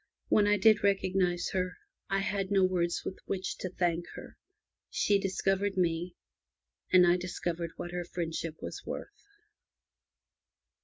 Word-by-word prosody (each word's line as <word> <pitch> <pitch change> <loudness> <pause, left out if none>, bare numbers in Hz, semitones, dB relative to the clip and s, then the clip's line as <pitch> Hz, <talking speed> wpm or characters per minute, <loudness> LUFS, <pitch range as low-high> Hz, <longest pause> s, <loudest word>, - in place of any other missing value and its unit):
When 205 -1 +4
I 210 0 +4
did 215 -1 +5
recognize 190 -3 +1
her, 185 -1 -1 0.3
I 195 0 +1
had 195 -1 -1
no 195 -2 +4
words 175 -2 +1
with 185 - -5
which 190 -1 -2
to 185 - -3
thank 175 -1 -1
her. - - -10 0.5
She 205 -1 +2
discovered 195 0 0
me, 175 0 0 0.8
and 180 -1 +7
I 175 +1 +4
discovered 175 -1 -3
what 175 - -5
her 175 0 -3
friendship 165 -2 -4
was - - -6
worth. - - -5
185 Hz, 140 wpm, -31 LUFS, 175-195 Hz, 0.8 s, and